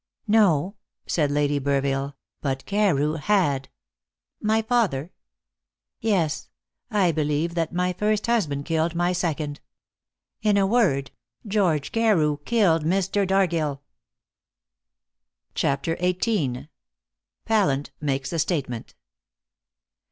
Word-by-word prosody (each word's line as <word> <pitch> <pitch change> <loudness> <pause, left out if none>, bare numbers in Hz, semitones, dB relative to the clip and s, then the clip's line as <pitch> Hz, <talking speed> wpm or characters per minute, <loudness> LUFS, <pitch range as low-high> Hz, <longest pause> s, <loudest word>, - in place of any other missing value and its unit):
"No," 200 -4 +3 0.3
said 150 -4 +1
Lady 145 0 +1
Burville, 140 0 -1 0.3
"but 135 -2 -2
Carew 165 -7 +1
had." 150 -7 +1 0.7
"My 220 +1 +2
father?" 200 - 0 0.9
"Yes; 165 -8 0 0.4
I 200 -6 +2
believe 155 +2 0
that 165 -2 -1
my 180 +1 0
first 210 +3 0
husband 160 -12 0
killed 165 0 0
my 175 +1 +1
second. 155 -4 -2 0.8
In 210 -2 +3
a 195 - +4
word, 190 - +2 0.3
George 185 -9 +1
Carew 185 -11 +2
killed 190 -9 +3
Mr. 195 +3 +1
Dargill." 170 -7 +1 1.7
CHAPTER 140 +4 0
XVIII. 175 - -1 0.8
PALLANT 190 -11 +1
MAKES 140 0 -2
A 165 - -1
STATEMENT. 135 -8 -2
165 Hz, 100 wpm, -24 LUFS, 145-200 Hz, 1.7 s, a